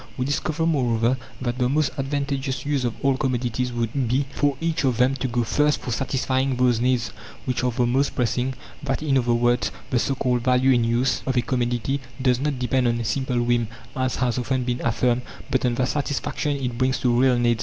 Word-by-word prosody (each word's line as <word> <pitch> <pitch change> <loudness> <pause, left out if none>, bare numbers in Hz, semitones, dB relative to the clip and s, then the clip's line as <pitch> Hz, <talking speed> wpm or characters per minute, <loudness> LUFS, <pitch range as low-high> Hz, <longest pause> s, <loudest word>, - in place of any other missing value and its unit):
We 125 - -1
discover, 155 +3 -1
moreover, 125 -6 +2 0.3
that 120 0 -2
the 125 0 +2
most 150 +2 +1
advantageous 135 -2 -2
use 140 -3 0
of 120 - -1
all 135 -1 +3
commodities 125 -1 -1
would 120 +2 -1
be, 130 +4 +1
for 145 -2 +1
each 165 -2 -1
of 130 -4 +1
them, 125 +2 +3
to 130 - -1
go, 120 0 0
first, 150 +6 +2
for 125 - -5
satisfying 130 +1 0
those 125 -2 +2
needs 125 -2 +1 0.4
which 125 -1 -1
are 125 - +2
the 120 0 +1
most 135 +4 +1
pressing: 125 +2 0 0.3
that, 140 +1 -2
in 140 -3 +1
other 120 -2 +2
words, 120 +1 +2 0.2
the 120 - +3
so 135 - 0
called 125 -2 0
"value 130 +1 +3
in 120 -2 +3
use" 120 +2 +1
of 130 -1 0
a - - +5
commodity 125 +2 -1 0.2
does 125 -2 +2
not 145 -1 -1
depend 125 0 +1
on 120 0 +1
a 115 - -3
simple 125 +1 0
whim, 120 -1 +1 0.3
as 130 -1 0
has 125 -1 0
often 130 +1 -1
been 125 0 -2
affirmed, 120 +2 +1 0.3
but 130 - +1
on 120 - 0
the 125 - +1
satisfaction 145 +1 -1
it 125 -3 -3
brings 130 0 +2
to 125 -2 +1
real 130 -2 +4
needs. 120 -1 +2
125 Hz, 215 wpm, -24 LUFS, 120-135 Hz, 0.4 s, a